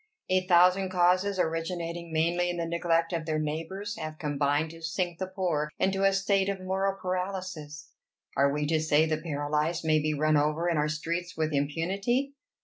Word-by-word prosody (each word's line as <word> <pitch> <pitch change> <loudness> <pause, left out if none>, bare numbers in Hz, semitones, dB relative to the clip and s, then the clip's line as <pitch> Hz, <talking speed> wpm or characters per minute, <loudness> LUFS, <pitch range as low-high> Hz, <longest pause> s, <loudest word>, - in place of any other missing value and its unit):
A 185 0 +2
thousand 180 +2 +5
causes, 185 +2 +2
originating 170 0 -2
mainly 170 +2 +1
in 175 - -2
the 170 - -1
neglect 165 0 0
of 165 -1 -2
their 155 -1 0
neighbors, 165 +8 -3
have 155 0 -6
combined 145 0 0
to 165 0 -12
sink 175 +1 -2
the 190 - -2
poor 175 -6 -1
into 195 0 +1
a 195 - +5
state 195 0 +1
of 195 -1 -2
moral 190 +1 -1
paralysis: 180 -5 -4 0.4
are 140 0 +3
we 150 +1 -1
to 160 +1 +1
say 155 0 +3
the 155 -1 0
paralyzed 155 +1 -1
may 155 -1 +4
be 155 0 0
run 155 +1 +3
over 155 +3 +1
in 170 - +1
our 150 0 +1
streets 170 +3 -3
with 155 -1 0
impunity? 195 - 0
170 Hz, 180 wpm, -28 LUFS, 155-185 Hz, 0.4 s, thousand